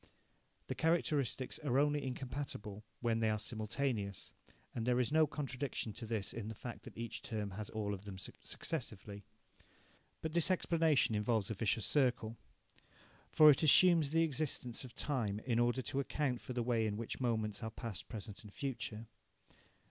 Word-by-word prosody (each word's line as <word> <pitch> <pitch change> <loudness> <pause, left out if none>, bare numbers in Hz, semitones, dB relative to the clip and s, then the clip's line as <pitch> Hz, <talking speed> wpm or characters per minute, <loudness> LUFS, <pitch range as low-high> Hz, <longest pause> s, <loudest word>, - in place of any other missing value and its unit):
The - - -3
characteristics 150 -6 0
are 140 -5 0
only 145 0 +3
incompatible 125 -5 -5 0.2
when 115 -2 +1
they 110 -1 +2
are 110 - +1
simultaneous, 110 -1 -2 0.4
and 115 - -2
there 125 +1 +2
is 125 +2 +1
no 155 0 +5
contradiction 135 -5 -3
to 115 - -6
this 110 -3 -2
in 115 -2 -5
the 110 - -5
fact 120 +2 -8
that - - -11
each 115 -1 -4
term 105 -3 -3
has 105 +2 -6
all 105 -2 -2
of 100 0 -7
them 100 -2 -7
successively. 100 - -5 1.0
But 160 -1 -2
this 170 +1 +4
explanation 165 -8 +3
involves 105 0 +1
a - - +1
vicious 105 0 +1
circle. 125 -5 +2 1.0
For 155 -1 +9
it 135 - +2
assumes 165 0 +7
the 165 +2 +3
existence 140 -5 0
of 125 -1 -10
time 115 -10 0
in 120 -2 +2
order 120 +2 +2
to 135 - -1
account 135 -2 -1
for 125 - -6
the 120 -1 0
way 115 -2 +2
in 105 -1 -2
which 115 0 -4
moments 110 -4 0
are 110 - -3
past, 110 -4 -6
present 105 -2 -7
and 105 - -11
future. 115 -3 -4
120 Hz, 170 wpm, -36 LUFS, 110-140 Hz, 1.0 s, For